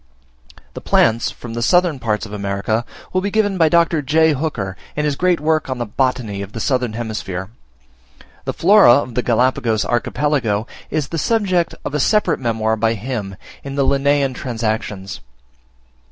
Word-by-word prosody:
The - - -7
plants 115 +1 +2
from 120 -2 -9
the 115 - -3
southern 175 +2 +2
parts 110 -2 -1
of 105 - -10
America 100 +3 -2 0.3
will 185 - +2
be 200 - -1
given 205 -3 +1
by 160 -1 +5
Dr. 170 -1 +3
J. 155 +3 +3
Hooker, 125 -10 -3 0.2
in 150 - -1
his 145 -2 0
great 180 +2 +2
work 155 -1 0
on 130 - -2
the 120 - -2
Botany 115 -3 -1
of 100 +1 -8
the - - -5
Southern 125 -1 0
Hemisphere. 110 -4 -5 0.9
The - - -2
Flora 195 - +6
of 125 -4 -1
the 125 - 0
Galapagos 120 -2 +1
Archipelago 120 -3 0 0.2
is 155 -2 -2
the 165 - -3
subject 185 -4 +1
of - - -4
a 150 - 0
separate 210 +8 +2
memoir 110 -3 0
by 115 +1 +1
him, 105 -4 -5 0.3
in 140 0 -6
the 140 - +2
'Linnean 140 -1 +2
Transactions.' 110 -6 -3
125 Hz, 170 wpm, -19 LUFS, 110-155 Hz, 0.9 s, Flora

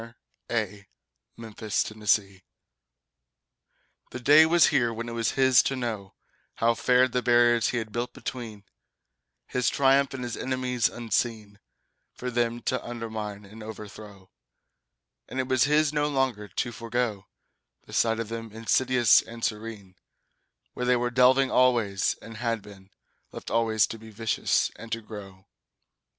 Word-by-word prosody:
The 105 -3 -3 0.5
New 115 -2 -10
Tenants 110 0 +1 1.9
The 125 - -7
day 150 +6 +7
was 170 0 +5
here 125 -6 +2
when 115 +1 -5
it - - -5
was 115 -1 -1
his 130 -2 +5
to 135 - -2
know 110 -6 -5 0.4
How 115 +1 +2
fared 125 +1 +3
the 125 - 0
barriers 120 -1 +4
he 120 - -2
had 110 -2 -4
built 120 +2 -3
between 110 -5 -7 0.8
His 125 - 0
triumph 135 0 +3
and 130 - -5
his 120 -1 -4
enemies 130 -2 -1
unseen, 110 -3 -3 0.6
For 125 0 -5
them 120 0 -1
to 130 - -1
undermine 110 -3 -6
and 110 +3 -13
overthrow; 105 -2 -10 1.0
And 130 - -4
it 130 - -1
was 130 0 +3
his 150 0 +2
no 150 0 +1
longer 130 -7 -1
to 120 - -3
forego 115 -3 -3 0.6
The - - -14
sight 115 -1 +2
of 115 -2 -4
them, 115 -1 -6
insidious 120 +1 +3
and 115 0 -6
serene, 105 -4 -6 0.8
Where 125 - -3
they 125 - +4
were 120 0 -1
delving 130 +2 +4
always 115 -6 +2
and 115 0 -10
had 115 -3 -2
been 95 -2 -14 0.4
Left - - -8
always 110 -2 +3
to 115 - -8
be 110 0 -12
vicious 110 -2 0
and 115 - -11
to 115 - -3
grow. 100 -3 -11
115 Hz, 145 wpm, -26 LUFS, 110-125 Hz, 1.9 s, day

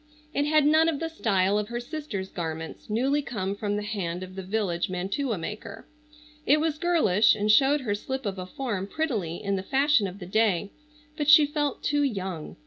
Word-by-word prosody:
It 285 +1 +1
had 305 -1 +4
none 315 +2 +5
of 300 -4 -2
the 330 - -3
style 205 -9 +1
of 210 - -3
her 240 +1 -4
sister's 245 -8 -5
garments, 160 0 -6
newly 265 +7 +1
come 200 -8 -3
from 205 0 -2
the 210 - -2
hand 185 -4 -3
of 185 0 -9
the 190 - -6
village 190 -3 -1
mantua 200 +7 -2
maker. 210 +4 -7 0.6
It 295 +2 +4
was 310 -1 -1
girlish, 300 - +4
and 210 +1 +2
showed 275 +5 +4
her 215 -5 -1
slip 265 +5 -4
of 195 -2 -3
a 180 - -6
form 205 -4 -3
prettily 215 - -2
in 200 -1 0
the - - -2
fashion 270 0 +2
of 185 +1 -8
the 185 - -8
day, 205 -1 +1 0.5
but 295 -2 0
she 300 0 +9
felt 290 -2 -2
too 290 0 +1
young. 190 - -3
215 Hz, 200 wpm, -26 LUFS, 190-285 Hz, 0.6 s, she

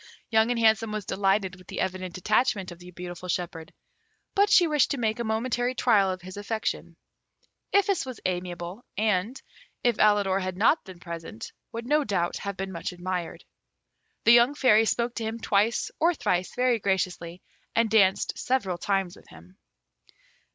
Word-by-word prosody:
Young 220 +1 +4
and 245 -1 0
Handsome 220 -1 +3
was 215 -2 -4
delighted 195 -1 0
with 185 - -18
the - - -6
evident 185 -1 -3
attachment 205 -1 +1
of 175 - -11
the 180 0 -12
beautiful 180 0 -8
shepherd; 170 -3 -3 0.6
but 405 +1 +3
she 365 -3 +6
wished 300 -3 +2
to 280 - -1
make 220 -2 -1
a - - -1
momentary 245 +3 -1
trial 210 -6 +3
of 185 -1 -4
his 185 +2 -9
affection. 215 +2 -3 0.8
Iphis 395 -2 +2
was 255 -3 -8
amiable, 180 +3 -4
and, 215 +3 0 0.4
if 240 -3 +2
Alidor 205 -2 +3
had 185 -1 -4
not 230 - +3
been 185 -3 -11
present, 170 +6 -8 0.2
would 230 +1 -6
no 300 +3 +2
doubt 180 -7 -1
have 200 -1 -5
been 195 0 -4
much 170 -2 -4
admired. 180 -1 -5 0.8
The 230 - +6
young 240 +4 +5
Fairy 225 -6 +5
spoke 235 +3 0
to 230 - -2
him 220 +1 -3
twice 215 +1 +1
or 335 +2 +3
thrice 180 -8 -1
very 250 -2 +2
graciously, 185 -3 -2 0.3
and 230 0 +3
danced 200 -3 +2
several 200 -9 -1
times 195 -3 -1
with - - -18
him. 85 +3 -16
205 Hz, 170 wpm, -26 LUFS, 185-235 Hz, 0.8 s, she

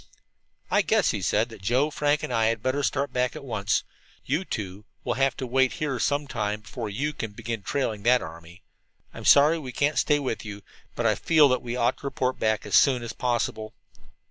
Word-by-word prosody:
"I - - +4
guess," - - +2
he - - -3
said, 110 +3 +1
"that 110 -4 -12
Joe, 125 +9 +1
Frank 145 0 +1
and - - -3
I 115 -1 +2
had 115 -1 0
better 130 +2 0
start 140 0 -1
back 125 +2 0
at 155 - -8
once. 110 -4 0 0.4
You 150 +8 0
two 100 - -5 0.2
will - - -1
have 135 +2 +1
to 130 - -3
wait 130 +1 +2
here 140 -5 -2
some 145 +3 0
time 105 -5 -3
before 115 0 -6
you 140 +9 -2
can 115 -6 -5
begin 115 0 -5
trailing 110 -1 -2
that 125 +4 +4
army. 85 +3 -11 0.5
I'm - - -9
sorry 150 +4 +6
we 130 -5 -7
can't 145 +4 +1
stay 150 - +3
with 130 -5 -3
you, 105 -1 -8 0.3
but - - -2
I - - +4
feel 155 -3 +4
that 130 -1 +1
we 120 0 -4
ought 120 0 +1
to 140 - -5
report 130 -1 -1
back 110 -1 0
as - - -7
soon 130 -4 +4
as 120 - -5
possible." 115 -3 -2
125 Hz, 215 wpm, -26 LUFS, 110-140 Hz, 0.5 s, sorry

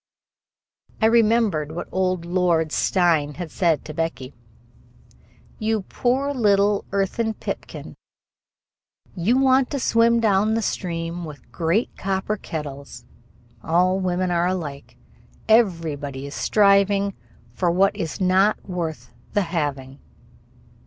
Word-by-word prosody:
I 220 - +2
remembered 220 -9 +2
what 175 - -5
old 185 -2 -1
Lord 170 -3 +1
Steyne 160 -7 +1
had 175 -3 -6
said 170 -5 +1
to 155 - -7
Becky: 160 -5 -4 1.3
"You 220 -1 0
poor 265 +7 -1
little 205 -4 +2
earthen 215 +3 -1
pipkin. - - -7 1.2
You 205 +8 +2
want 265 -1 +3
to 280 - -3
swim 230 -1 +3
down 215 0 +2
the 225 - -1
stream 170 -2 -3
with 150 -3 -11
great 175 +8 0
copper 195 +2 -2
kettles. 145 -7 -7 0.6
All 180 +3 +2
women 185 -1 -1
are 175 0 +1
alike. 155 -7 -5 0.5
Everybody 160 - +1
is 140 - -8
striving 200 -1 +3 0.4
for 175 +8 0
what 190 +3 +2
is 160 -2 -4
not 190 +3 +2
worth 170 -4 -5 0.2
the 205 - +2
having." 145 -6 -3
185 Hz, 115 wpm, -22 LUFS, 165-210 Hz, 1.3 s, want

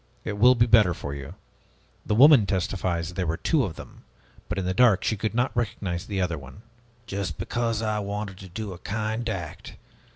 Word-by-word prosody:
It 105 -2 -4
will 125 +3 +7
be 115 -1 +4
better 110 -7 +5
for 70 - -6
you. 70 +4 -8 0.7
The 105 - +1
woman 130 -3 +7
testifies, 90 -2 -1
'There 90 -1 -2
were 80 +1 -1
two 155 -5 +1
of 95 -8 -4
them,' - - -12 0.5
but - - -2
in 95 - -1
the 90 - 0
dark 110 -2 +4
she 110 - +1
could 110 +2 -3
not 125 +2 0
recognize 100 -7 -2
the 100 -2 -2
other 85 -4 -1
one." 70 +10 -13 0.4
"Just 100 -7 -4
because 115 -2 -2
I 110 -1 0
wanted 100 -1 -4
to 95 - -10
do 100 +2 -5
a 85 - -11
kind 110 +2 -3
act! 90 -8 -6
100 Hz, 200 wpm, -25 LUFS, 90-110 Hz, 0.7 s, will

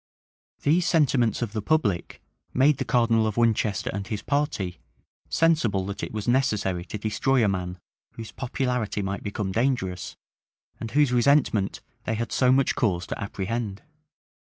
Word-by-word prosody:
These 165 +5 +3
sentiments 130 -9 +2
of 110 -3 -4
the 110 - -2
public 105 - 0 0.3
made 135 +2 +4
the 135 - -1
cardinal 115 -2 +3
of 110 - -3
Winchester 110 -3 +1
and 100 -1 -4
his 105 -1 -4
party 120 - -1 0.5
sensible 120 - +2
that 100 +1 -5
it - - -4
was 105 -2 -5
necessary 105 -8 +1
to 105 - -5
destroy 110 +4 +1
a - - +3
man 90 -2 -2 0.4
whose 115 -1 -8
popularity 125 -5 -2
might 100 +1 -3
become 100 -1 -3
dangerous, 115 -6 -1 0.6
and 115 - -5
whose 145 +1 +3
resentment 120 -5 +2 0.2
they 115 - -1
had 115 +1 -3
so 125 -1 +3
much 135 +1 +3
cause 90 -7 0
to - - -5
apprehend. 100 +2 -4
115 Hz, 150 wpm, -25 LUFS, 100-130 Hz, 0.6 s, made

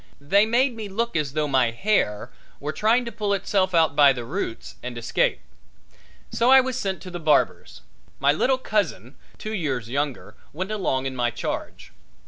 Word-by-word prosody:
They 200 +10 +3
made 245 +2 +2
me 215 -2 -6
look 230 +3 -2
as 150 -4 -1
though 155 0 0
my 130 -4 +2
hair 115 - 0 0.3
were 150 +2 -4
trying 230 +6 +2
to 235 - -5
pull 205 -2 -1
itself 185 -1 0
out 160 -4 +3
by 145 -2 +6
the 120 -2 -6
roots 140 - -5
and 125 -1 -6
escape. 115 0 0 0.9
So 235 +2 +2
I 265 0 +9
was 260 -1 -1
sent 195 -6 -3
to 185 - -8
the 175 - -5
barber's. 155 - +1 0.4
My 140 +1 +4
little 255 - +2
cousin, 185 - -2 0.2
two 215 - -6
years 135 - -2
younger, 140 +1 -3 0.2
went 185 +7 -4
along 155 -11 -1
in 135 -1 -3
my 120 -1 +1
charge. 120 - -6
165 Hz, 180 wpm, -24 LUFS, 135-215 Hz, 0.9 s, I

